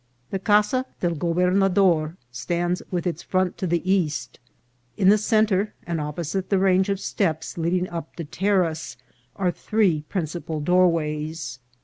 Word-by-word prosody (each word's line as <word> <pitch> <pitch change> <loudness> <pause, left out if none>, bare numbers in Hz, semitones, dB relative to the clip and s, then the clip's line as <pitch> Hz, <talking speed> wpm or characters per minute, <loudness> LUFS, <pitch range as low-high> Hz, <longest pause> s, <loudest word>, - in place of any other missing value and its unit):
The 195 - -1
Casa 210 +6 +2
del 175 -1 0
Gobernador 180 0 +2
stands 175 +8 -1
with 180 -1 -2
its 175 -2 -2
front 185 -1 0
to 185 - -1
the 175 +1 -1
east. 175 -6 0 0.6
In 195 -3 +5
the 210 - +6
centre, 215 -2 +2
and 170 -2 -2
opposite 165 +5 -3
the 195 - +3
range 190 0 +3
of 195 -1 0
steps 165 -6 -2
leading 180 +2 0
up 170 -3 -7
the 170 - -5
terrace, 165 -6 0 0.4
are 185 -2 +1
three 190 -5 +1
principal 165 -3 -3
doorways. 160 -4 0
180 Hz, 140 wpm, -24 LUFS, 165-195 Hz, 0.6 s, the